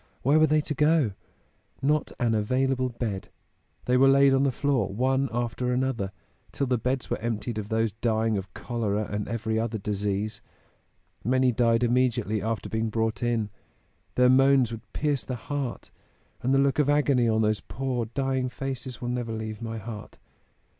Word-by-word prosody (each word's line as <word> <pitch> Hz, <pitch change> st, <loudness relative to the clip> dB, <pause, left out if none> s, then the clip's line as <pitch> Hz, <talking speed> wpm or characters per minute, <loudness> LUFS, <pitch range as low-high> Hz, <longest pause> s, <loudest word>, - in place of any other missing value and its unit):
Where 145 Hz, +5 st, +4 dB
were 155 Hz, -, +5 dB
they 155 Hz, +1 st, +3 dB
to 150 Hz, -, -3 dB
go? 150 Hz, -4 st, +3 dB, 0.7 s
Not 150 Hz, +2 st, +1 dB
an 120 Hz, -3 st, +2 dB
available 130 Hz, +4 st, +1 dB
bed. 115 Hz, -5 st, -4 dB, 0.6 s
They 125 Hz, +1 st, +3 dB
were 135 Hz, +1 st, +6 dB
laid 135 Hz, 0 st, +6 dB
on 135 Hz, -, +3 dB
the 140 Hz, -1 st, +3 dB
floor 135 Hz, -5 st, +1 dB
one 130 Hz, +5 st, +1 dB
after 120 Hz, +1 st, -1 dB
another, 125 Hz, -6 st, -1 dB, 0.4 s
till 140 Hz, -, -1 dB
the 125 Hz, -2 st, +1 dB
beds 125 Hz, +2 st, -2 dB
were -, -, 0 dB
emptied 115 Hz, 0 st, -3 dB
of 105 Hz, 0 st, -6 dB
those 110 Hz, -1 st, +1 dB
dying 110 Hz, 0 st, 0 dB
of 95 Hz, -1 st, -4 dB
cholera 110 Hz, -3 st, -2 dB
and 105 Hz, 0 st, -2 dB
every 110 Hz, -1 st, -1 dB
other 115 Hz, 0 st, -1 dB
disease. 105 Hz, +1 st, -2 dB, 0.8 s
Many 130 Hz, +2 st, +3 dB
died 115 Hz, 0 st, +2 dB
immediately 120 Hz, -3 st, +1 dB
after 110 Hz, +1 st, -2 dB
being 110 Hz, 0 st, -1 dB
brought 110 Hz, -1 st, -1 dB
in 115 Hz, -4 st, 0 dB, 0.6 s
their 125 Hz, 0 st, +5 dB
moans 135 Hz, -1 st, +5 dB
would 115 Hz, 0 st, -9 dB
pierce 145 Hz, -3 st, 0 dB
the 125 Hz, -, -4 dB
heart 135 Hz, +1 st, -4 dB, 0.5 s
and 130 Hz, -, 0 dB
the 135 Hz, -, +4 dB
look 140 Hz, +1 st, +2 dB
of 145 Hz, -1 st, +3 dB
agony 140 Hz, -5 st, +3 dB
on 110 Hz, 0 st, +2 dB
those 105 Hz, 0 st, +1 dB
poor 125 Hz, +3 st, -3 dB
dying 130 Hz, +2 st, -1 dB
faces 130 Hz, -1 st, -5 dB
will 120 Hz, -, -3 dB
never 120 Hz, -2 st, -2 dB
leave 110 Hz, 0 st, -5 dB
my 115 Hz, -1 st, -4 dB
heart. 110 Hz, 0 st, -8 dB
120 Hz, 175 wpm, -27 LUFS, 110-135 Hz, 0.8 s, were